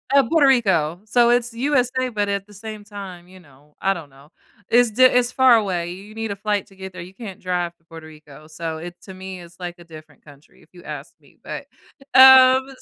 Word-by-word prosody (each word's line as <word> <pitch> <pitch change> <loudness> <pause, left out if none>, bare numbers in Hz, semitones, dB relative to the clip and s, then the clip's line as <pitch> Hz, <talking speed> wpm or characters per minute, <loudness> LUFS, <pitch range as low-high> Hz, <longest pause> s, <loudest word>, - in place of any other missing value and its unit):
Uh, 275 - +6
Puerto 320 -4 +4
Rico. 190 - +1
So 235 +2 +3
it's 240 -1 0
USA 255 0 0
but 205 -3 -2
at 200 -1 -2
the 210 - -17
same 215 +1 -9
time, 195 -4 -10
you 185 +1 -16
know, 145 -2 -23
I 195 - +2
don't 165 -6 -10
know. 135 +2 -20 0.4
Is 240 -1 +4
thi 255 +5 +2
it's 250 -1 +4
far 260 -2 +5
away. 180 -6 -1
You 205 +4 -13
need 225 -2 -4
a - - -4
flight 205 0 -2
to 195 - -20
get 190 0 -9
there. 180 - -8
You 180 +2 -11
can't 195 -3 -10
drive 175 -2 -3
to - - -40
Puerto 165 -1 -12
Rico. 155 -1 -15
So, 160 0 -6
it 175 +1 -9
to 190 - -11
me, 190 0 -9
is 170 0 -14
like 175 -1 -6
a - - -13
different 155 -2 -15
country, 145 0 -19
if - - -24
you 175 - -15
ask - - -8
me. - - -25
But, - - -8 0.5
um, 260 0 +8
195 Hz, 230 wpm, -21 LUFS, 170-235 Hz, 0.5 s, um